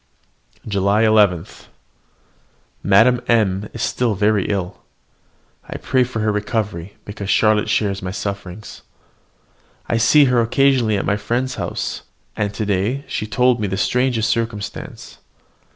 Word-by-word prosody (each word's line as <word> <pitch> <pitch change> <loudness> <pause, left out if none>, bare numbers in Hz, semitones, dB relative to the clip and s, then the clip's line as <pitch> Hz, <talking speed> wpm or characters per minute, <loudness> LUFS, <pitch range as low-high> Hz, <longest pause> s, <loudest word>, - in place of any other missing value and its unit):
JULY 100 +1 +1
11. 105 -6 +3 1.4
Madame 115 +6 +4
M 105 -3 +1
is - - -3
very 105 -4 +1
ill. 95 -3 -3 0.9
I - - -5
pray 130 -1 +1
for 120 -3 -4
her 110 0 +1
recovery, 105 -4 -3
because 100 -1 -7
Charlotte 110 0 +3
shares 100 -2 0
my 90 - -4
sufferings. 100 0 -6 1.1
I 115 - 0
see 140 +6 +5
her 125 -2 +3
occasionally 120 -2 +2
at - - -2
my 100 +2 +1
friend's 125 +4 -2
house, - - -4 0.3
and 105 -1 -1
to 105 +1 -4
day 105 +8 -1
she - - -3
has 110 - -14
told 125 -2 +2
me 105 - 0
the 95 0 -3
strangest 125 -2 +1
circumstance. 115 -3 -5
105 Hz, 135 wpm, -19 LUFS, 100-120 Hz, 1.4 s, see